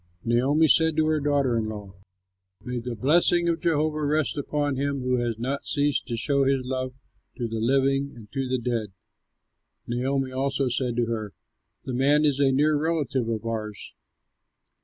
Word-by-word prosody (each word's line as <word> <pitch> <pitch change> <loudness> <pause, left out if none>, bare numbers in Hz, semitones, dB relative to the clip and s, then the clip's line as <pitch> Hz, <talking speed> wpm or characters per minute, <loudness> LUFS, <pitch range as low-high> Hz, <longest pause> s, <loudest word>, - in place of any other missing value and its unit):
Naomi 135 +7 +3
said 160 +1 +4
to 155 - +3
her 155 0 +2
daughter 140 -4 +1
in 110 -1 -1
law, 105 -3 -8 0.7
"May 125 0 -3
the 120 0 -5
blessing 170 +7 +3
of 170 -1 +1
Jehovah 155 -2 +1
rest 150 0 +1
upon 145 0 -1
him 140 0 -1
who 125 0 +1
has 120 -2 -1
not 130 +4 -3
ceased 145 -1 0
to 120 - -2
show 140 +4 +2
his 135 -1 +1
love 130 0 -3 0.4
to 120 - -2
the 115 0 -4
living 135 +3 +1
and 110 -3 -13
to 135 -1 -2
the 130 - +1
dead." 115 -4 -3 0.9
Naomi 130 +2 -1
also 135 0 0
said 120 0 -1
to 120 0 +1
her, 110 -3 -4 0.5
"The 130 - -5
man 145 +4 +3
is 140 -2 +1
a 140 -1 +4
near 150 +3 +3
relative 145 -6 0
of 115 0 -3
ours." 110 -2 -5
135 Hz, 175 wpm, -25 LUFS, 120-145 Hz, 0.9 s, said